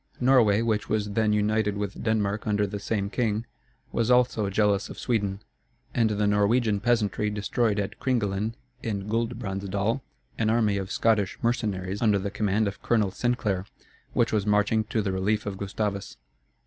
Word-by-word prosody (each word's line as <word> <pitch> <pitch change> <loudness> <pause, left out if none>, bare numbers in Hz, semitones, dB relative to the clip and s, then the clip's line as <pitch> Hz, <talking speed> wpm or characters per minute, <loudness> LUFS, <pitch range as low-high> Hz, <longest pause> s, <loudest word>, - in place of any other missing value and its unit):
Norway, 120 -5 +4
which 110 -2 0
was 105 -1 0
then 110 +1 +2
united 105 0 +1
with 100 -1 -4
Denmark 110 -1 0
under 105 -1 +2
the 100 +1 -5
same 100 -1 -2
king, 110 -2 0 0.5
was 115 0 0
also 125 -5 +3
jealous 100 0 +1
of - - -9
Sweden; 105 -5 -1 0.5
and 115 -2 +3
the 105 0 0
Norwegian 105 +1 +2
peasantry 105 -2 +1
destroyed 105 +1 0
at 100 - -4
Kringelen, 110 -3 0 0.3
in 100 -4 -3
Guldbrandsdal, 110 0 -1 0.4
an 110 -1 +2
army 110 -3 +2
of 95 0 -4
Scottish 105 -4 +1
mercenaries, 100 -5 -1
under 105 -3 +4
the 100 +1 -3
command 105 +1 +1
of 100 - -5
Colonel 110 -5 +2
Sinclair, 105 -4 -1 0.5
which - - +1
was 105 -1 +1
marching 105 +1 +2
to 110 -1 -1
the 100 - -1
relief 100 +3 0
of 100 -2 -4
Gustavus. 100 0 -3
105 Hz, 160 wpm, -26 LUFS, 100-115 Hz, 0.5 s, Norway